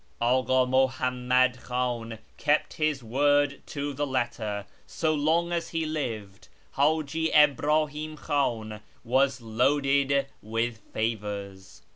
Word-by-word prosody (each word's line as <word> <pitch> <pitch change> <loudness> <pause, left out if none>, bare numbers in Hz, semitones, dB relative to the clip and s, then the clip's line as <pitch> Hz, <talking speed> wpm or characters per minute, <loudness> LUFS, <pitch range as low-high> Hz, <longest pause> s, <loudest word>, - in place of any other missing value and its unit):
Aka 130 +2 +3
Muhammad 125 -1 +1
Khan 120 -2 -3 0.2
kept 150 +1 +1
his 155 -4 -1
word 145 +4 +2
to 145 0 -4
the 145 +2 -2
letter. 115 -6 -2 0.2
So 160 -1 0
long 160 +3 +1
as 170 -1 -2
he 165 -1 -2
lived, 115 -11 -5 0.3
Htiji 155 +2 +1
Ibrahim 150 +1 +2
Khan 110 -8 -2 0.2
was 130 +1 +1
loaded 140 +4 +2 0.2
with 115 +2 -2
favours. 100 -3 -4
130 Hz, 105 wpm, -27 LUFS, 115-145 Hz, 0.3 s, Aka